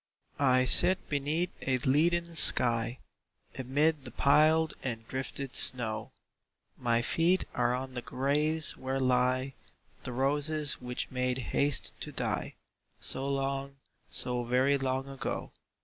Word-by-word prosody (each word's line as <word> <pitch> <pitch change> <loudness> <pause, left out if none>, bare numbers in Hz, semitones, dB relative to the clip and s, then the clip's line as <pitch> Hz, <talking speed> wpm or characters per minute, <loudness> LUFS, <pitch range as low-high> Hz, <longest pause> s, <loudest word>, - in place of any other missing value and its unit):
II. 140 - +2
I 130 0 +4
sit 180 +8 +4
beneath 150 +5 -1
a 130 -1 +1
leaden 170 +6 +1
sky, 120 -5 +2 0.6
Amid 145 +3 0
the 130 - -7
piled 155 +5 +3
and 115 -3 -5
drifted 130 0 -5
snow; 110 -3 0 0.6
My 120 -1 0
feet 170 +8 +2
are 120 0 +1
on 130 +1 -5
the 125 - -4
graves 150 +5 0
where 130 +1 -3
lie 130 +1 +1 0.5
The 125 - -5
roses 145 +3 0
which 125 0 -4
made 125 0 -1 0.2
haste 145 0 +2
to - - -6
die - - -3 0.4
So 135 +1 -1
long, 135 0 -2 0.3
so 125 -1 +1
very 130 +4 +2
long 130 0 -1
ago. 135 -1 -5
135 Hz, 130 wpm, -30 LUFS, 125-145 Hz, 0.6 s, I